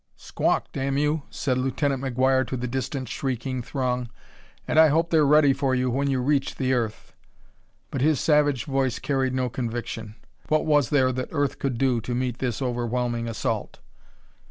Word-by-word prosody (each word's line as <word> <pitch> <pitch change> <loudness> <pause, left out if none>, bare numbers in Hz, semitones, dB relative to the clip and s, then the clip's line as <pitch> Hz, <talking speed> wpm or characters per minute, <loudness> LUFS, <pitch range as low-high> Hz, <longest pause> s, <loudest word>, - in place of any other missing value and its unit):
"Squawk, - - -1
damn 135 0 -1
you!" 150 +2 +1
said 130 -3 -1
Lieutenant 135 +1 0
McGuire 130 0 +2
to 130 - -3
the 125 +1 -3
distant 130 +1 -3
shrieking 130 +1 -3
throng; 125 -1 -2 0.6
"and 155 - +3
I 160 - +8
hope 165 +3 +1
they're 155 -3 +4
ready 145 -1 +5
for 135 -1 0
you 125 0 0
when 140 +3 0
you 130 -2 +1
reach 140 0 +1
the 130 -1 0
earth." 115 -4 -3 0.8
But 135 - -2
his 150 -1 +3
savage 145 -4 +2
voice 135 -3 0
carried 135 -2 -1
no 130 -1 0
conviction. 115 -3 -5 0.3
What 155 +1 +2
was 145 -5 +3
there 130 -3 +3
that 130 0 -4
Earth 145 -2 -1
could 135 -4 -1
do 125 -2 +1
to 120 +2 -3
meet 125 -1 -2
this 125 0 -2
overwhelming 120 -1 -1
assault? 115 - -3
130 Hz, 175 wpm, -25 LUFS, 125-140 Hz, 0.8 s, I